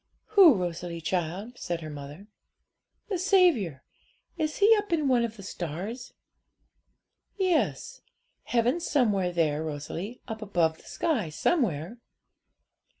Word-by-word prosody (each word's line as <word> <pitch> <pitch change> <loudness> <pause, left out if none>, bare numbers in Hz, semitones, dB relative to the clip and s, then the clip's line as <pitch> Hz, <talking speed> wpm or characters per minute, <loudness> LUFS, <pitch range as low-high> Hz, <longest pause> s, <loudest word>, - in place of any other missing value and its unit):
'Who, 385 - +8
Rosalie, 175 -2 -4
child?' 185 +8 -3
said 170 -2 -3
her 155 - -6
mother. 145 +6 -9 0.8
'The 380 -4 -1
Saviour; 340 - +3 0.5
is 310 -3 -2
He 425 +3 +6
up 415 -3 -3
in 310 -4 +1
one 250 -3 +3
of 230 -1 -4
the 200 - -10
stars?' 190 - -6 1.2
'Yes; 385 +6 0 0.4
heaven's 245 +8 +1
somewhere 205 -10 +2
there, 160 -3 0
Rosalie; 160 +9 -5
up 220 0 -6
above 170 -6 +1
the - - -20
sky 250 - -1
somewhere.' 185 - 0
210 Hz, 120 wpm, -27 LUFS, -, 1.2 s, Who